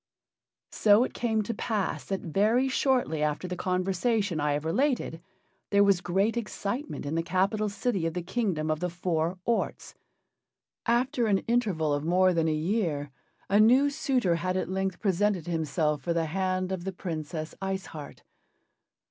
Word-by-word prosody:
So 210 +2 +5
it - - -4
came 220 -2 0
to 230 - -3
pass 215 -5 -2
that 195 -1 -3
very 215 - +2
shortly 255 - +1
after 150 +4 -1
the 180 - -4
conversation 185 +1 0
I 145 0 +1
have 145 +2 -2
related 235 - 0 0.5
there 200 0 +5
was 200 -3 +3
great 195 +6 +1
excitement 235 - -4
in 145 - -3
the 165 - +1
capital 195 +5 0
city 200 -4 -1
of 165 - -4
the 180 - -2
Kingdom 180 -6 -1
of 155 - -1
the 180 - -1
Four 170 0 -1
Orts. 235 -1 -1 0.9
After 240 0 +2
an 200 -2 +2
interval 200 -11 +1
of 145 0 -1
more 185 +3 +3
than 165 -1 +1
a - - +2
year 155 -3 -1 0.4
a 200 +2 +3
new 255 +6 +5
suitor 255 - +1
had 185 +2 -1
at 185 - -2
length 190 -1 -2
presented 195 -3 +1
himself 155 -3 0
for 170 - -1
the 165 -1 0
hand 185 +2 -1
of 185 -2 -3
the 190 +1 -4
Princess 160 -3 -5
Ice 190 0 -2
Heart. 150 -2 -10
185 Hz, 165 wpm, -28 LUFS, 165-215 Hz, 0.9 s, So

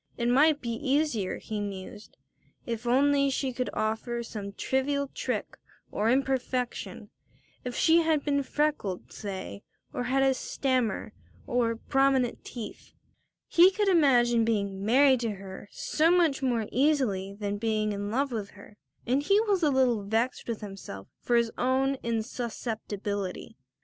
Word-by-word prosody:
It 235 0 0
might 295 +4 +4
be 235 - -3
easier, 260 -5 0
he 215 -1 -5
mused, 200 +1 -7 0.5
if 235 0 -4
only 280 +2 +3
she 265 -1 -1
could 250 +1 -2
offer 230 +2 -2
some 205 -3 -6
trivial 280 +4 -1
trick - - -3 0.3
or 215 +2 0
imperfection, 255 -1 -1 0.5
if 250 -1 -5
she 330 0 +4
had 320 -3 +2
been 280 -1 +2
freckled, 280 -9 -2
say, 190 - -6 0.3
or 245 - -2
had 270 +2 +2
had 270 - +4
a - - +2
stammer, 255 -5 -1 0.3
or 235 -2 +1
prominent 270 0 +1
teeth. 230 -4 -9 0.5
He 350 +2 +7
could 405 +1 0
imagine 245 -9 +4
being 200 -3 -1
married 260 +4 +5
to 230 -3 -2
her 195 +1 -10
so 315 +2 +1
much 335 -6 +3
more 240 -4 0
easily 240 -9 +1
than 205 -1 -3
being 215 -1 0
in 205 0 -4
love 270 +5 0
with 210 -4 -4
her, 205 +1 -15 0.3
and 255 +4 +2
he 395 +8 +3
was 405 -4 +1
a 305 - +4
little 255 -5 +2
vexed 225 +5 -1
with 230 -2 -3
himself 195 - -8
for 240 - +1
his 235 -1 +2
own 265 +2 +1
insusceptibility. 220 -4 -4
245 Hz, 150 wpm, -28 LUFS, 215-275 Hz, 0.5 s, He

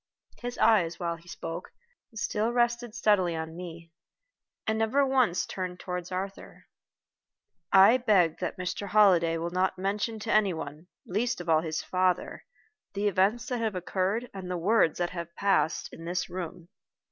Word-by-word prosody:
His 245 0 -5
eyes, 185 -7 +3
while 170 -1 -1
he 170 +1 -20
spoke, 165 0 -7 0.4
still 220 +1 -1
rested 240 -1 0
steadily 200 -7 +2
on 160 0 -5
me, 170 -1 -9 0.7
and 220 0 0
never 260 +6 +3
once 255 -9 +2
turned 180 -1 -5
toward 180 -1 -5
Arthur. 190 +2 -6 1.1
"I 195 +6 +7
beg 195 -10 +3
that - - -3
Mr. 185 +3 -4
Holliday 180 -5 +4
will 170 +1 -3
not 185 +1 0
mention 205 +4 -2
to 225 - -1
any 205 -4 +3
one, 155 +2 -7 0.2
least 235 +5 -1
of 175 -1 -6
all 160 -1 +5
to 165 - -5
his 160 0 -2
father, 185 -1 0 0.5
the 205 +1 +1
events 205 +5 +2
that 250 -2 -1
have 220 -3 -1
occurred 190 +6 -1
and 190 -2 -7
the 180 - -2
words 185 -1 +3
that 175 -1 -1
have 170 -1 -7
passed 195 -5 +1
in 165 - -9
this 180 +2 -2
room. 175 -1 -6
185 Hz, 165 wpm, -28 LUFS, 170-215 Hz, 1.1 s, I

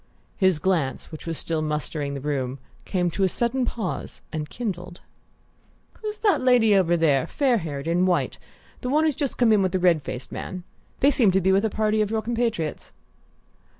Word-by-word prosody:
His 185 -4 +3
glance, 160 -5 -1
which 155 +1 -9
was 165 -1 -3
still 160 -1 -2
mustering 150 -1 -2
the - - -4
room, 135 -2 -2 0.3
came 180 -3 0
to 195 - -1
a 190 - +3
sudden 240 +5 0
pause 215 -8 -4
and 150 -1 -3
kindled. 180 -6 -5 1.0
"Who's 425 -1 -4
the 425 -2 +2
lady 245 -5 +4
over 175 -3 +3
there 145 -5 +2
fair 260 -5 +2
haired, 145 -3 -5
in 175 +2 +2
white 180 -2 0 0.4
the 250 - -4
one 300 +4 +3
who's 310 -3 +2
just 280 -2 -1
come 235 -3 +4
in 210 - +4
with 185 -1 0
the - - +3
red 175 -4 +4
faced 125 -2 -6
man? 185 -1 -6 0.4
They 280 - +6
seem 250 -7 +4
to 190 +1 +3
be 190 +1 +2
with 195 +3 +3
a - - +1
party 215 +1 +1
of 210 - 0
your 220 0 -1
compatriots." 230 -9 -2
185 Hz, 195 wpm, -24 LUFS, 160-230 Hz, 1.0 s, They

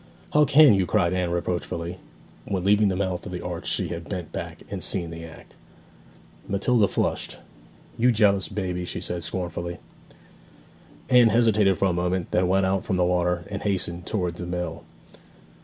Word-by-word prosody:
'How 150 0 +5
can 145 -2 +7
you!' 95 -2 +1
cried 90 -5 +2
Anne 90 -1 0
reproachfully. 85 0 -3 0.5
When 95 -3 -2
leaving 105 +2 +4
the 95 - 0
mouth 95 -2 -2
of - - -7
the 90 -1 -6
arch 90 -1 -5
she - - -1
had 85 0 -6
bent 90 -5 -5
back - - -6
and - - -4
seen 85 -3 -2
the 85 0 -8
act. 80 -1 -13 0.9
Matilda 100 +2 +2
flushed. - - -2 0.6
'You 125 +2 +5
jealous 100 -4 +3
baby!' 90 -3 -3
she - - -4
said 90 -1 -3
scornfully. 85 0 -4 1.3
Anne 125 -2 +6
hesitated 105 -4 +3
for - - +1
a 95 - +2
moment, 90 0 -1
then 90 0 +2
went 95 +1 +2
out 95 0 0
from 95 - -1
the 90 - +3
water, 90 -1 +1
and 100 - -4
hastened 90 -3 -1
towards 90 -5 -2
the 85 - -5
mill. 90 0 -4
90 Hz, 175 wpm, -25 LUFS, 90-100 Hz, 1.3 s, can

